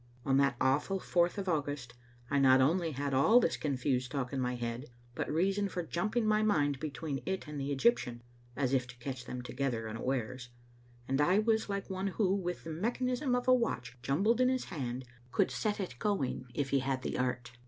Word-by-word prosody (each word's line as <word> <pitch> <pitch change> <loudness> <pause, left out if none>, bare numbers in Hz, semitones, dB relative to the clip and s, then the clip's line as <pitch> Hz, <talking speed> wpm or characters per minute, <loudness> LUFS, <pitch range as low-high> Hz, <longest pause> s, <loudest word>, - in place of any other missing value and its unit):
On 135 -2 +3
that 140 -2 +3
awful 145 +9 +2
fourth 175 0 +1
of 195 -1 -3
August 145 -6 -2 0.4
I 140 - +3
not 130 -1 +6
only 165 +4 +2
had 140 +1 -2
all 180 - +6
this 190 - +1
confused 130 -3 -1
talk 135 -2 -3
in 135 - -1
my 125 0 -1
head 120 +3 -4 0.3
but - - -3
reason 195 +5 +1
for 180 0 -3
jumping 215 +8 -1
my 215 0 +3
mind 145 -10 +2
between 140 -1 -4
it 190 -3 -3
and 150 -1 -5
the 140 +1 -2
Egyptian 135 - +1 0.3
(as 135 -2 0
if 125 -2 +2
to 120 0 -12
catch 125 0 -6
them 125 0 -5
together 125 -3 -2
unawares), 125 +2 -3 0.6
and 135 +2 +1
I 180 +6 +4
was 220 0 +2
like 200 0 -3
one 190 +1 -2
who, 195 0 +1
with 180 -3 -2
the 165 - -6
mechanism 250 - 0
of 245 0 -2
a 255 - +7
watch 230 - 0
jumbled 200 - +2
in 255 - +5
his 255 -1 0
hand, 130 -6 -4 0.3
could 195 +7 +2
set 210 -1 -1
it 175 -11 -5
going 135 -11 -1
if 140 -2 -1
he 140 - +4
had 130 0 -2
the - - -2
art. 125 -1 -1
145 Hz, 205 wpm, -32 LUFS, 130-195 Hz, 0.6 s, a